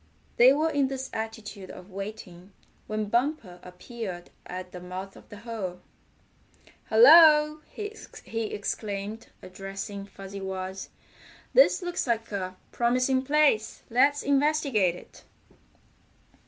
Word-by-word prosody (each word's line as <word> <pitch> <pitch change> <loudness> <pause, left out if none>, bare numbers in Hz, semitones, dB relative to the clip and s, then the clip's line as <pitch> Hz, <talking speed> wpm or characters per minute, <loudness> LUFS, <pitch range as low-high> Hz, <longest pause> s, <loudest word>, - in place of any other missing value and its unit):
They 250 +2 +8
were 310 +3 +1
in 285 -2 +2
this 265 0 -5
attitude 220 -3 -6
of 185 +2 -11
waiting 195 -2 -8 0.3
when 215 0 -2
Bumper 235 - -1
appeared 180 0 -8 0.2
at 180 0 -7
the 180 - -8
mouth 185 +2 -7
of - - -16
the 205 - -10
hole. 205 -5 -6 1.1
"Hello!" 300 +5 +7
he 415 - -6
exclaimed, 205 +1 -4 0.2
addressing 195 +2 -7
Fuzzy 195 0 -9
Wuzz. 190 0 -5 0.6
"This - - +5
looks 350 -5 -2
like 230 -1 -1
a 185 -2 -4 0.2
promising 255 +2 +1
place. 280 -5 +2
Let's 280 +4 +3
investigate 275 - +2
it." - - -15
220 Hz, 115 wpm, -27 LUFS, 195-270 Hz, 1.1 s, They